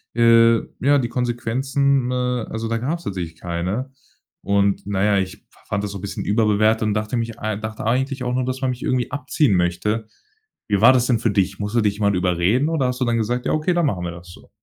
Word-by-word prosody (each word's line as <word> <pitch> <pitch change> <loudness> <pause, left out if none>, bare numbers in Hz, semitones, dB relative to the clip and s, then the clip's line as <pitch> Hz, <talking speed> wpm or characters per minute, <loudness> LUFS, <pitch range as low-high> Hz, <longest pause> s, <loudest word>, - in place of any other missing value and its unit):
äh, 115 0 +6 0.2
ja, 145 +2 +4
die 120 -4 -1
Konsequenzen, 125 +2 0
äh, 125 -2 -1
also 115 0 -4
da 115 0 -1
gab's 160 +8 -3
tatsächlich 85 -4 -5
keine. 90 +10 -3 0.5
Und, 100 0 +1
na 100 -1 0
ja, 105 -1 +3
ich 95 -1 -5
fa - - -24
fand 105 -1 -1
das 100 - -3
so 100 - -6
'n - - -11
bisschen 100 - -5
überbewertet 110 +1 +2
und 105 - +1
dachte 105 +3 -2
mich 115 -1 -3
ei 110 -1 -2
dachte 110 0 -6
eigentlich 130 +3 0
auch 125 0 -1
noch, 130 0 0
dass 130 +1 -3
man 130 -1 +1
mich 125 - -7
irgendwie 130 0 -1
abziehen 145 -3 +1
möchte. 105 +6 0 0.6
Wie 100 -1 +1
war 120 - +8
das 125 -1 +2
denn 120 -4 +2
für 115 -2 +1
dich? 95 -1 0
Musste 105 +3 0
dich 105 0 0
man 100 -2 +2
überreden 90 - +1
oder 150 -6 +1
hast 125 +1 -3
du 125 - +3
dann 120 -1 +1
gesagt: 120 +3 -1
„Ja, - - 0
okay, 155 +4 +1
dann 175 -1 +2
machen 95 -11 -1
wir 85 - -3
das 85 +1 -12
so?“ - - -16
115 Hz, 235 wpm, -21 LUFS, 100-125 Hz, 0.6 s, war